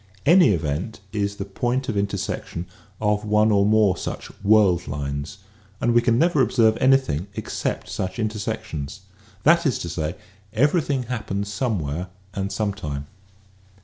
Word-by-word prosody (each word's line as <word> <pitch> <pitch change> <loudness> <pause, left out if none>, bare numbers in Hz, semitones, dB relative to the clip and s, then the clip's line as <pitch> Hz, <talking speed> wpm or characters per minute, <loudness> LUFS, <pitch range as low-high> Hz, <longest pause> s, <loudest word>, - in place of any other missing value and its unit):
Any 170 -1 +7
event 85 +3 -1
is 100 -1 -1
the 100 - -5
point 120 +6 -1
of 115 - -2
intersection 100 -3 -2 0.3
of 105 -1 +1
one 105 +1 +3
or 100 -1 +4
more 105 -3 +4
such - - -6
world 100 -5 +4
lines 70 +3 -4 0.4
and 120 - +2
we 120 - +5
can 115 -1 +2
never 160 0 +3
observe 110 -4 +4
anything 130 - +3
except - - -3
such 95 0 -4
intersections. 110 -5 -4 0.4
That 170 +2 +5
is 130 - +1
to 85 - -5
say, 80 -1 -3 0.4
everything 140 +1 +2
happens 105 -5 -3
somewhere 90 - -2 0.3
and 100 +1 -3
some 105 -2 -1
time. 70 -6 -5
105 Hz, 145 wpm, -23 LUFS, 95-120 Hz, 0.4 s, Any